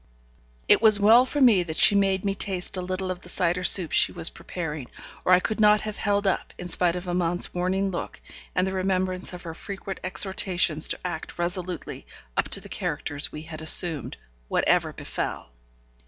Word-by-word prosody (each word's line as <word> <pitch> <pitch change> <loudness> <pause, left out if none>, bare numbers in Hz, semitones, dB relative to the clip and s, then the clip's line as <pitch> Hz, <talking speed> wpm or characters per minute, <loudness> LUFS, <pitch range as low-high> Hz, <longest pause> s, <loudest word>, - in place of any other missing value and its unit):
It - - +5
was 215 -2 +5
well 230 +5 +5
for 290 - -3
me 235 -9 +5
that 160 -2 -6
she - - +7
made 195 -1 +1
me 195 - 0
taste 195 -2 -1
a 185 - -3
little 185 +1 -4
of 180 - -6
the 180 - -11
cider 180 0 -1
soup 180 -3 +5
she - - +3
was 165 - -2
preparing, 150 -7 -7 0.4
or - - 0
I 180 - +6
could 215 +4 -4
not 210 0 +4
have 215 -1 -6
held 205 -1 -1
up, 195 - -2
in 180 - -7
spite 175 -1 +3
of 180 0 -7
Amante's 175 0 -1
warning 190 +2 -1
look, 175 - -6 0.4
and 180 - +1
the 190 - -3
remembrance 185 -1 0
of 180 -1 -10
her 165 -2 -7
frequent 195 +2 -8
exhortations 185 -4 +2
to - - -1
act 165 -3 -6
resolutely 175 0 -4 0.3
up - - -1
to - - +5
the - - -12
characters 145 0 -4
we 150 - -8
had 160 -1 -9
assumed, 160 -2 +3 0.3
whatever - - +1
befell. - - -6
185 Hz, 190 wpm, -24 LUFS, 175-195 Hz, 0.4 s, she